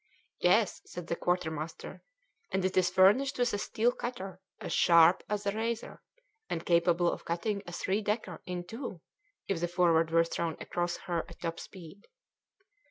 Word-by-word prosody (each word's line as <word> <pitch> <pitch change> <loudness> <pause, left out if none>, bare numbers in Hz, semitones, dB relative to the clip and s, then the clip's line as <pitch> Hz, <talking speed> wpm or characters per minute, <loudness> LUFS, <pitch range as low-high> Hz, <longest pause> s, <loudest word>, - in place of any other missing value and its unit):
"Yes," - - +3
said 180 - -7
the 170 - -2
quartermaster, 160 -3 -3 0.5
"and 190 -1 0
it 185 - 0
is 185 -1 +4
furnished 200 +10 +4
with 245 -1 +1
a 205 - 0
steel 230 +3 +1
cutter 195 -8 -6 0.2
as - - -4
sharp 170 +1 +6
as 210 0 -2
a 200 - +2
razor 225 +2 -3 0.5
and 165 - -3
capable 170 0 +3
of - - -6
cutting 200 +5 -2
a - - -6
three 190 +4 -1
decker 205 -4 -3
in 180 -1 -3
two 225 - -7 0.5
if 195 -4 -1
the 175 - +1
Forward 170 -2 +3
were 165 0 +4
thrown 165 -1 -3
across 175 0 -2
her 170 -2 -1
at - - -13
top 165 -1 -3
speed." 185 +1 -12
180 Hz, 165 wpm, -30 LUFS, 170-205 Hz, 0.5 s, sharp